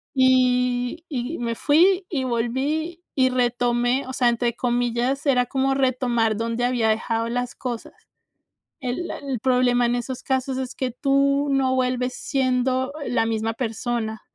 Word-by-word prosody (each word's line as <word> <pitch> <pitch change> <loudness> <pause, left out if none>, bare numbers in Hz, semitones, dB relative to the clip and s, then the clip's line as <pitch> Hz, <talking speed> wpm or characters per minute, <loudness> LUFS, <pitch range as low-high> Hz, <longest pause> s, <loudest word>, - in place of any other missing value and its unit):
y 250 +2 +2
y 270 +2 -3
me 235 -1 -2
fui, 360 - +3
y 270 -6 -1
volví, 275 +8 -2
y 260 -1 +3
retomé, 245 +1 +1
o 260 - -6
sea, 255 -2 +2
entre 235 0 0
comillas, 245 +3 0
era 250 -3 +3
como 270 +2 0
retomar 245 -4 +1
donde 230 +2 -2
había 245 -3 +1
dejado 225 +1 -1
las 245 +1 -2
cosas. 240 -3 -6 0.9
El 260 +5 -3
el 275 -4 -4
problema 250 -1 +3
en 240 - +1
esos 245 +1 -4
casos 265 0 -1
es 260 -1 -4
que 260 -1 -2
tú 275 +3 +2
no 265 -1 +2
vuelves 250 0 0
siendo 260 0 0
la 245 -2 +1
misma 225 0 -1
persona. 225 -1 -3
250 Hz, 145 wpm, -23 LUFS, 240-265 Hz, 0.9 s, fui